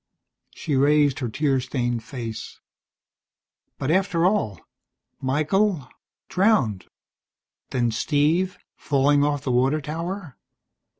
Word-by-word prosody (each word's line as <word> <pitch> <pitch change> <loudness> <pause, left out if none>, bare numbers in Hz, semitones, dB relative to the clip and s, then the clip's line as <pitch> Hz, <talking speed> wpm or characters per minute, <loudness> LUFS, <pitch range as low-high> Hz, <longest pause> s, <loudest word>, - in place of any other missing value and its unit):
She 150 - -2
raised 145 0 +3
her 125 -4 -2
tear 135 +2 +1
stained 120 -2 -2
face. 115 -3 -7 1.2
"But 135 - -1
after 180 -2 +2
all 180 - +1 0.6
Michael, 155 +4 +1 0.4
drowned. 185 - +2 0.8
Then 120 -2 0
Steve, 155 +9 +1 0.2
falling 145 0 +2
off 145 -1 0
the 130 - -1
water 130 +5 +2
tower. 165 - -5
145 Hz, 100 wpm, -24 LUFS, 130-165 Hz, 1.2 s, raised